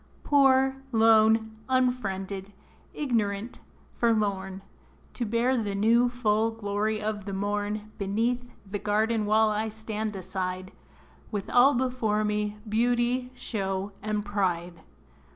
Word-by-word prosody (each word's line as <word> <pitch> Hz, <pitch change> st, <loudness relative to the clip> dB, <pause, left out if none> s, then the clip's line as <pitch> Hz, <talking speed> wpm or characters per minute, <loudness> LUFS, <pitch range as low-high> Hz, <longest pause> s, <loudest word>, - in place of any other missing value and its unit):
Poor, 270 Hz, -2 st, +4 dB
lone, 220 Hz, -1 st, +4 dB
unfriended, 200 Hz, -7 st, -1 dB, 0.4 s
ignorant, 225 Hz, -5 st, -2 dB, 0.3 s
forlorn, 200 Hz, -4 st, 0 dB, 0.5 s
To 240 Hz, -, -3 dB
bear 235 Hz, +4 st, +1 dB
the 210 Hz, -5 st, -1 dB
new, 230 Hz, +4 st, +4 dB
full 225 Hz, -2 st, +1 dB
glory 215 Hz, -1 st, -2 dB
of 210 Hz, -2 st, -3 dB
the 200 Hz, -, -5 dB
morn, 205 Hz, +2 st, -2 dB
Beneath 225 Hz, +5 st, 0 dB, 0.2 s
the 200 Hz, +1 st, -4 dB
garden 215 Hz, +1 st, +1 dB
wall 215 Hz, +1 st, +4 dB
I 215 Hz, +1 st, -1 dB
stand 220 Hz, -1 st, -4 dB
aside, 185 Hz, 0 st, -4 dB, 0.6 s
With 205 Hz, -3 st, -4 dB
all 250 Hz, +3 st, +6 dB
before 240 Hz, -4 st, 0 dB
me, 210 Hz, 0 st, -1 dB
beauty, 240 Hz, +3 st, +1 dB
show, 195 Hz, -4 st, -3 dB
and 210 Hz, 0 st, -2 dB
pride. 180 Hz, -4 st, -2 dB
215 Hz, 115 wpm, -27 LUFS, 200-235 Hz, 0.6 s, all